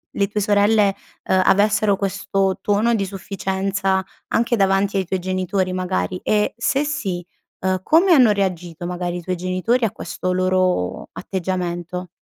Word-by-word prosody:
le 200 Hz, -, +1 dB
tue 210 Hz, +1 st, -2 dB
sorelle, 205 Hz, 0 st, +3 dB, 0.3 s
ehm, 190 Hz, 0 st, +2 dB
avessero 205 Hz, +1 st, +3 dB
questo 195 Hz, 0 st, -1 dB
tono 215 Hz, +3 st, +2 dB
di 200 Hz, -3 st, 0 dB
sufficienza 190 Hz, 0 st, -2 dB, 0.3 s
anche 235 Hz, +1 st, +1 dB
davanti 195 Hz, 0 st, +2 dB
ai 190 Hz, -, 0 dB
tuoi 190 Hz, +2 st, -2 dB
genitori, 185 Hz, +1 st, -1 dB
magari? 185 Hz, 0 st, -2 dB
E 210 Hz, -1 st, +1 dB
se 270 Hz, +4 st, +1 dB
sì, 195 Hz, -, -3 dB, 0.4 s
uhm, 185 Hz, 0 st, 0 dB
come 340 Hz, -, +4 dB
hanno 250 Hz, -8 st, +6 dB
reagito, 180 Hz, -4 st, -2 dB
magari, 180 Hz, 0 st, -3 dB
i -, -, -6 dB
tuoi 185 Hz, +2 st, -2 dB
genitori 185 Hz, +7 st, 0 dB
a 205 Hz, -, -1 dB
questo 185 Hz, -, -4 dB
loro 185 Hz, -, 0 dB
atteggiamento? 180 Hz, -1 st, -4 dB
190 Hz, 145 wpm, -21 LUFS, 185-205 Hz, 0.4 s, hanno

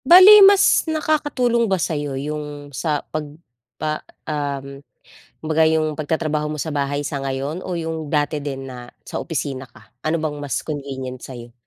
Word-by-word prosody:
Bale 390 Hz, +4 st, +10 dB
mas 395 Hz, -4 st, +6 dB
nakakatulong 290 Hz, -7 st, +1 dB
ba 190 Hz, -, +2 dB
sa'yo 145 Hz, -5 st, -2 dB
yung, 145 Hz, 0 st, -6 dB
sa 150 Hz, +1 st, -1 dB
'pag 150 Hz, -1 st, -5 dB, 0.4 s
pa 155 Hz, 0 st, -2 dB, 0.2 s
um, 140 Hz, -2 st, -4 dB, 0.6 s
kumbaga 160 Hz, 0 st, +2 dB
yung 155 Hz, -1 st, +1 dB
pagtatrabaho 155 Hz, 0 st, -1 dB
mo 150 Hz, -1 st, -3 dB
sa 160 Hz, -, -3 dB
bahay 145 Hz, -1 st, -1 dB
sa 145 Hz, 0 st, -3 dB
ngayon 135 Hz, +6 st, -3 dB
o 185 Hz, -, -3 dB
yung 160 Hz, -2 st, -3 dB
dati 150 Hz, +1 st, 0 dB
din 135 Hz, -2 st, -5 dB
na 125 Hz, -1 st, -8 dB, 0.2 s
sa -, -, -6 dB
opisina 140 Hz, -5 st, -3 dB
ka? -, -, -20 dB, 0.2 s
Ano 155 Hz, +1 st, 0 dB
bang 150 Hz, -2 st, -2 dB
mas 145 Hz, -1 st, -3 dB
convenient 135 Hz, -4 st, -5 dB
sa'yo? 120 Hz, -2 st, -10 dB
150 Hz, 160 wpm, -21 LUFS, 140-160 Hz, 0.6 s, Bale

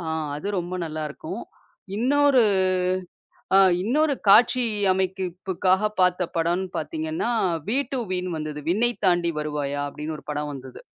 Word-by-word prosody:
அ -, -, -7 dB, 0.3 s
அது 150 Hz, +7 st, -5 dB
ரொம்ப 175 Hz, +1 st, -6 dB
நல்லா 155 Hz, -1 st, -5 dB
இருக்கும். 315 Hz, -, -7 dB, 0.5 s
இன்னொரு, 275 Hz, +2 st, +4 dB, 1.1 s
ஆ -, -, +8 dB, 0.2 s
இன்னொரு 290 Hz, +8 st, +2 dB
காட்சி 240 Hz, +4 st, +6 dB, 0.3 s
அமைப்புக்காக 190 Hz, +1 st, 0 dB
பார்த்த 180 Hz, -1 st, +2 dB
படம்ன்னு 175 Hz, +3 st, 0 dB
பார்த்தீங்கன்னா, 320 Hz, -3 st, -3 dB, 0.4 s
வீ 240 Hz, +5 st, +2 dB
டூ 265 Hz, -, 0 dB
வீன்னு 180 Hz, -2 st, -2 dB
வந்தது. 150 Hz, -1 st, -5 dB
'விண்ணை 235 Hz, +6 st, +3 dB
தாண்டி 175 Hz, -2 st, +2 dB
வருவாயா' 145 Hz, -1 st, -3 dB
அப்படின்னு 155 Hz, +2 st, -6 dB
ஒரு -, -, -14 dB
படம் 150 Hz, 0 st, -3 dB
வந்தது. 130 Hz, -1 st, -10 dB
185 Hz, 130 wpm, -24 LUFS, 155-240 Hz, 1.1 s, ஆ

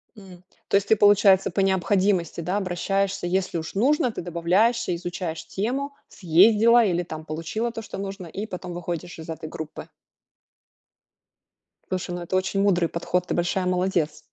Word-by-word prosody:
М, 185 Hz, -4 st, -14 dB, 0.2 s
то -, -, 0 dB
есть 200 Hz, -, -2 dB
ты, 220 Hz, -, +5 dB
получается, 205 Hz, -2 st, +5 dB
по -, -, -3 dB
необходимости, 190 Hz, -2 st, +1 dB
да, 180 Hz, +4 st, -1 dB
обращаешься, 195 Hz, 0 st, -1 dB
если 185 Hz, 0 st, -1 dB
уж 160 Hz, -1 st, -5 dB
нужно, 250 Hz, +3 st, +2 dB
ты -, -, -6 dB
добавляешься, 180 Hz, +5 st, +1 dB
изучаешь 170 Hz, -2 st, -5 dB
тему, 265 Hz, +8 st, -2 dB
съездила 215 Hz, +7 st, +5 dB
или 175 Hz, -3 st, +1 dB
там 155 Hz, -2 st, -8 dB
получила 165 Hz, +10 st, -3 dB
то, 225 Hz, -, -6 dB
что 220 Hz, -, -8 dB
нужно, 195 Hz, -2 st, -6 dB
и 200 Hz, +6 st, -5 dB
потом 180 Hz, -3 st, -7 dB
выходишь 175 Hz, 0 st, -5 dB
из 160 Hz, -, -9 dB
этой 160 Hz, -1 st, -6 dB
группы. 160 Hz, -1 st, -8 dB, 2.0 s
Слушай, 185 Hz, -1 st, -3 dB
ну, 175 Hz, -, -5 dB
это 175 Hz, +2 st, -3 dB
очень 190 Hz, +1 st, 0 dB
мудрый 180 Hz, -4 st, +2 dB
подход, 180 Hz, +1 st, -2 dB
ты -, -, -1 dB
большая 180 Hz, +2 st, 0 dB
молодец! 180 Hz, -4 st, 0 dB
185 Hz, 160 wpm, -24 LUFS, 175-205 Hz, 2.0 s, ты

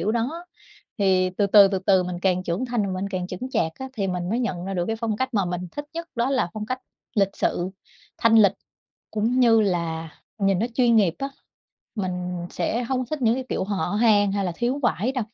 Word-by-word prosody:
kiểu 210 Hz, +6 st, 0 dB
đó 270 Hz, +10 st, -2 dB, 0.5 s
thì 185 Hz, -2 st, +3 dB
từ 200 Hz, +2 st, 0 dB
từ, 200 Hz, 0 st, +8 dB
từ 190 Hz, -1 st, -1 dB
từ 190 Hz, 0 st, +3 dB
mình 180 Hz, -1 st, -4 dB
càng 185 Hz, -1 st, +2 dB
trưởng 180 Hz, +6 st, -2 dB
thành 240 Hz, -3 st, 0 dB
mà 195 Hz, -, -2 dB
mình 200 Hz, -, -2 dB
càng 185 Hz, -2 st, -3 dB
chững 190 Hz, +8 st, -6 dB
chạc 160 Hz, -9 st, 0 dB
á 265 Hz, -, -5 dB
thì 205 Hz, -6 st, -2 dB
mình 180 Hz, -1 st, -2 dB
mới 230 Hz, -, +1 dB
nhận 180 Hz, -7 st, -2 dB
ra 195 Hz, +1 st, -4 dB
được 175 Hz, -1 st, 0 dB
cái 225 Hz, -, -1 dB
phong 220 Hz, -2 st, -2 dB
cách 260 Hz, +1 st, -2 dB
mà 200 Hz, -, +2 dB
mình 180 Hz, 0 st, -4 dB
thích 290 Hz, -, -5 dB
nhất 335 Hz, 0 st, -5 dB
đó 240 Hz, +1 st, 0 dB
là 260 Hz, -10 st, +1 dB
phong 215 Hz, -1 st, -4 dB
cách 255 Hz, +3 st, -3 dB, 0.3 s
lịch 195 Hz, -3 st, +3 dB
sự, 175 Hz, +2 st, 0 dB, 0.5 s
thanh 230 Hz, 0 st, +5 dB
lịch 205 Hz, -4 st, +6 dB, 0.6 s
cũng 230 Hz, +4 st, +1 dB
như 230 Hz, -2 st, +6 dB
là 170 Hz, -5 st, -1 dB, 0.3 s
nhìn 195 Hz, -2 st, +2 dB
nó 220 Hz, -, +1 dB
chuyên 240 Hz, -2 st, +4 dB
nghiệp 190 Hz, -6 st, +3 dB
á, 275 Hz, -, -2 dB, 0.7 s
mình 180 Hz, -3 st, -3 dB
sẽ 235 Hz, +3 st, -1 dB
hông 255 Hz, 0 st, -1 dB
thích 305 Hz, 0 st, -4 dB
những 230 Hz, 0 st, +4 dB
cái 260 Hz, -, -3 dB
kiểu -, -, -1 dB
hở 200 Hz, 0 st, -2 dB
hang 205 Hz, -4 st, +4 dB
hay 200 Hz, 0 st, 0 dB
là 180 Hz, -, -1 dB
thiếu 245 Hz, +4 st, 0 dB
vải 240 Hz, +1 st, +1 dB
đâu. 255 Hz, -, -1 dB
205 Hz, 235 wpm, -24 LUFS, 185-240 Hz, 0.7 s, từ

